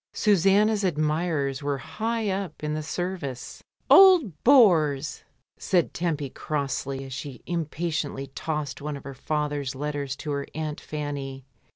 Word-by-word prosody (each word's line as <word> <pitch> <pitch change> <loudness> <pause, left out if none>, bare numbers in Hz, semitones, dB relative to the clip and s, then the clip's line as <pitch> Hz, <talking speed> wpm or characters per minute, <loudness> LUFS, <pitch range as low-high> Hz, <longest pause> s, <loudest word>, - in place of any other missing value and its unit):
Susanna's 205 +1 +3
admirers 155 -4 0
were 145 -1 -1
high 225 - -3
up 190 -4 -3
in 150 0 -1
the 155 - -2
service. 160 -5 -5 0.2
"Old 345 - +6
bores!" 160 - +4 0.4
said 175 -3 +1
Tempy 155 -6 -2
crossly 140 -2 -3
as 135 - -8
she 130 -1 -7
im 170 -2 -1
patiently 155 -4 -3
tossed 150 -2 -3
one 150 0 -4
of 140 - -12
her 140 - -7
father's 145 -1 -2
letters 145 -1 -3
to 150 - -5
her 140 -1 -2
aunt 155 -1 -4
Fanny. 140 -3 -5
150 Hz, 140 wpm, -26 LUFS, 140-175 Hz, 0.4 s, Old